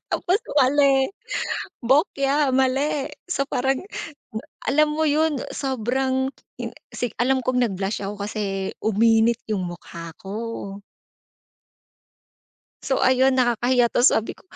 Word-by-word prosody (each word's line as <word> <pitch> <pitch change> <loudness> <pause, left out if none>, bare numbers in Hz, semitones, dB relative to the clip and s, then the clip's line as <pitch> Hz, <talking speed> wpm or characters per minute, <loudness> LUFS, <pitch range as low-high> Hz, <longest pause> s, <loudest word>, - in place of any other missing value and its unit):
Tapos 370 +2 +1 0.2
mali, 270 0 +4 0.7
bokya, 275 +1 +2
mali, 270 +2 +1 0.2
so, 275 -6 -1
parang 265 +1 0 0.9
alam 305 +2 +4
mo 315 +1 0
'yun, 300 -1 +2
sobrang 265 +1 0 0.3
'yung - - -4 0.2
si 245 - -2
alam 260 +2 +2
kong 250 0 +1
nag 225 - -1
blush 195 +2 -2
ako, 200 +1 -4
kasi, 200 -3 -3
uminit 225 +2 +3
'yung 205 -4 -1
mukha 170 -1 -8
ko. 195 +2 -6 2.5
So, 265 - 0
ayun 260 +1 +3
nakakahiya 245 0 +3
'to, 245 - +3
sabi 225 -4 +3
ko, - - -22
260 Hz, 115 wpm, -23 LUFS, 225-275 Hz, 2.5 s, mali